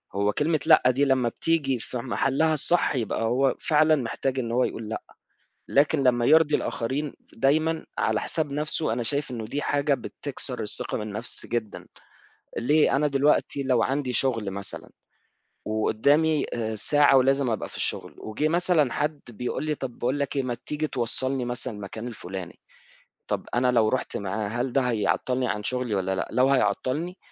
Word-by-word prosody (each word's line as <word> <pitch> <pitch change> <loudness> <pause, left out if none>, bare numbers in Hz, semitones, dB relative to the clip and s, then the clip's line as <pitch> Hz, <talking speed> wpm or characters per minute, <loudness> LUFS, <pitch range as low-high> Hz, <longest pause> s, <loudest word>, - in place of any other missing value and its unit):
هو 100 +1 +2
كلمة 155 +1 +1
لأ - - +7
دي 140 +3 +1
لمّا 130 -3 +2
بتيجي 140 -4 0
في 125 - -5
محلّها 135 +5 +1
الصح 155 +1 +2
يبقى 115 -2 -2
هو 130 +3 +2
فعلًا 155 0 +3
محتاج 135 0 -2
إن 115 -2 -3
هو 125 +2 +2
يقول 110 -3 -4
لأ، 110 - -4 0.7
لكن 145 +1 +3
لمّا 120 -2 +3
يرضي 155 0 +5
الآخرين 135 +5 -3 0.2
دايمًا 155 +6 +1
على 110 -1 +1
حساب 155 -3 -2
نفْسه 150 -2 -1
أنا 120 - -1
شايف 140 +4 0
إنه 115 -3 -5
دي 145 +6 -3
حاجة 145 0 +1
بتكسر 125 - -5
الثقة - - -1
بالنفس 105 +2 -2
جدًا، 115 -3 -4 0.7
ليه، 150 +4 +3
أنا 150 +2 +2
دلوقتي 140 0 +1
لو 130 -3 +2
عندي 135 -1 -1
شغل 115 -4 +1
مثلًا 100 -1 -6 0.8
وقدّامي 140 +8 +2
آآ 110 -2 -2
ساعة 145 +5 +4
ولازم 135 0 +3
أبقى 110 - -2
في - - -10
الشغل، - - 0
وجه 145 +8 -2
مثلًا 170 -5 +2
حد 150 0 -2
بيقول 125 +6 -4
لي 155 -1 0
طب 130 -4 -7
باقول 130 +4 -1
لك 140 0 -2
إيه 135 - +1
ما 125 -1 -2
تيجي 150 +1 -2
توصّلني 130 0 -1
مثلًا 120 -1 -2
المكان 105 +4 -7
الفلاني، 95 -6 -8 0.7
طب - - -2
أنا 125 +1 +3
لو 115 -3 +3
رُحت 130 - -2
معاه 100 +1 -3
هل 120 +2 -2
ده 135 - +3
هيعطّلني 125 +2 0
عن 105 -2 -2
شغلي 125 -2 -1
والّا 95 0 -1
لأ؟ - - -2
لو 130 +3 +3
هيعطّلني 135 - 0
130 Hz, 170 wpm, -25 LUFS, 115-145 Hz, 0.8 s, لأ